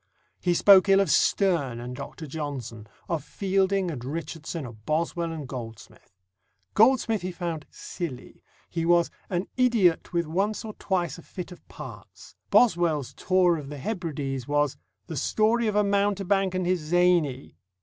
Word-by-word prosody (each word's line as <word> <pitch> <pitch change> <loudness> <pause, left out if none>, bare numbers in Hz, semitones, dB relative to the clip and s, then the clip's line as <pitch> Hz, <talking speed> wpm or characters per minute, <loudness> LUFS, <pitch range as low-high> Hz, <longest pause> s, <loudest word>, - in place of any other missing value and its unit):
He 175 -1 +1
spoke 195 +1 +7
ill 195 0 +6
of 195 - +2
Sterne 160 - +2
and 125 +1 -6
Dr. 155 - -8
Johnson, 135 -8 -6 0.2
of 165 -5 -2
Fielding 190 +2 0
and 125 -6 -6
Richardson, 160 +2 -5
of 110 -3 -11
Boswell 165 +4 -1
and 155 -4 -6
Goldsmith. 115 -6 -10 0.6
Goldsmith 225 -1 +4
he 185 +1 -3
found 170 -3 -5
"silly"; 135 -8 -7 0.3
he 165 -1 -3
was 170 0 +3 0.2
"an 180 0 -1
idiot 230 -10 +3
with 170 -1 0
once 195 +8 -1
or 215 - -6
twice 180 -3 -1
a - - -10
fit 180 +2 -8
of 180 - -12
parts." - - -11
Boswell's 170 - +3
Tour 185 -2 +2
of 140 -3 -7
the 145 - -6
Hebrides 145 - -4
was 145 -1 +1 0.3
"the 160 - -6
story 220 - +2
of 210 - -1
a 210 - +4
mountebank 200 -1 +1
and 185 -1 0
his 180 0 +1
zany." 165 -4 +1
170 Hz, 155 wpm, -26 LUFS, 145-195 Hz, 0.6 s, spoke